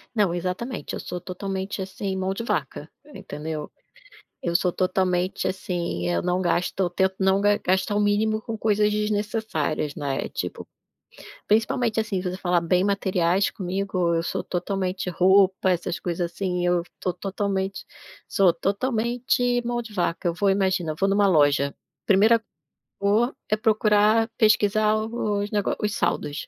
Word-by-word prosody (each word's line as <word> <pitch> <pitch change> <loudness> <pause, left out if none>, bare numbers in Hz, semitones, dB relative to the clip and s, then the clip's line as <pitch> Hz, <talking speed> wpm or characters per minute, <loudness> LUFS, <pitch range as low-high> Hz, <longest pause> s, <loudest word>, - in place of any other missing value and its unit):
Não, 205 -6 +2
exatamente, 180 - -4
eu - - -4
sou 180 - -5
totalmente, 190 +1 -4
assim, 190 0 -4
mão 190 0 -1
de 230 - -5
vaca, - - -3 0.2
entendeu. 155 -5 -6 0.7
Eu 170 -1 -1
sou 180 0 +3
totalmente, 185 0 0
assim, 170 - -2
eu 85 - +1
não 180 +1 0
gasto 175 0 0
eu 185 -2 +2
tento 190 +2 0
não 190 0 +3
ga 205 0 +3
gastar 190 +2 0
o 205 - +2
mínimo 215 +1 +1
com 225 0 -5
coisas 210 -1 +2
desnecessárias, 210 -8 -1
né, 140 -2 -2
tipo, - - -5 0.8
principalmente, 225 +1 +1
assim, 215 -4 0
se 180 0 -3
você 180 - -5
falar 180 -2 +1
bem 180 +2 +2
materiais 190 -2 +1
comigo, 185 -2 -1
eu 165 - +1
sou - - -3
totalmente 185 +1 -2
roupa, 190 +1 +4
essas 175 -1 -1
coisas, 175 -1 -2
assim, 180 0 -2
eu 175 -1 +2 0.2
tô 180 - -1
totalmente 195 0 -3 0.4
sou 190 -3 +4
totalmente 245 +4 0
mão 240 0 -1
de 230 -2 -9
vaca. 175 -1 0
Eu 170 - -1
vou 200 +3 +2
imagina, 190 -4 +1
eu - - -9
vou 195 - +3
em - - +2
uma 205 0 +4
loja, 145 -5 +3 0.3
primeira 220 +4 +5 0.6
cor 215 +6 +2
é 215 - +2
procurar 215 +1 +3
pesquisar 215 -1 +3
os 215 -2 -2
nego 205 -2 0
os 210 -1 -1
saldos. 145 +1 -2
195 Hz, 155 wpm, -24 LUFS, 180-210 Hz, 0.8 s, primeira